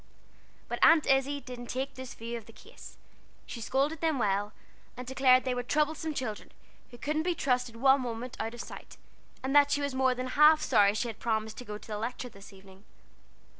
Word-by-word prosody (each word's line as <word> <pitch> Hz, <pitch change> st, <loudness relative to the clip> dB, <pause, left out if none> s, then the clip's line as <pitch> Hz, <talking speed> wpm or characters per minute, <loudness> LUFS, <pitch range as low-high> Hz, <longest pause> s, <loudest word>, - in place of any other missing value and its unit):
But -, -, -4 dB
Aunt 325 Hz, -2 st, +6 dB
Izzie 270 Hz, +1 st, +2 dB
didn't 250 Hz, -3 st, -9 dB
take 265 Hz, +3 st, -3 dB
this 260 Hz, -1 st, -9 dB
view 230 Hz, +1 st, -6 dB
of 230 Hz, -3 st, -8 dB
the -, -, -12 dB
case. -, -, -14 dB, 0.5 s
She 235 Hz, -, -8 dB
scolded 280 Hz, +6 st, 0 dB
them 320 Hz, -3 st, +1 dB
well, 205 Hz, -2 st, 0 dB, 0.5 s
and 250 Hz, -, -6 dB
declared 255 Hz, 0 st, +4 dB
they 255 Hz, -, -1 dB
were 245 Hz, -, -2 dB
troublesome 305 Hz, +4 st, -1 dB
children, 230 Hz, -6 st, -5 dB, 0.4 s
who 240 Hz, -, -13 dB
couldn't 305 Hz, +4 st, -1 dB
be 350 Hz, +1 st, -1 dB
trusted 250 Hz, -5 st, 0 dB
one 265 Hz, +3 st, +4 dB
moment 240 Hz, 0 st, -5 dB
out 225 Hz, +1 st, -3 dB
of 240 Hz, -, -6 dB
sight, -, -, -11 dB, 0.5 s
and 270 Hz, +2 st, -1 dB
that 285 Hz, -1 st, +7 dB
she 285 Hz, -, +1 dB
was 285 Hz, -1 st, -2 dB
more 260 Hz, -1 st, +2 dB
than 255 Hz, +1 st, -4 dB
half 300 Hz, +3 st, +6 dB
sorry 210 Hz, -8 st, +3 dB
she 235 Hz, +3 st, -1 dB
had 225 Hz, -1 st, -7 dB
promised 220 Hz, -1 st, -2 dB
to 250 Hz, -, -8 dB
go 210 Hz, -1 st, -6 dB
to -, -, -15 dB
the 210 Hz, -1 st, -4 dB
Lecture 245 Hz, +2 st, -4 dB
that 200 Hz, -2 st, -14 dB
evening. 195 Hz, 0 st, -16 dB
255 Hz, 205 wpm, -29 LUFS, 225-280 Hz, 0.5 s, that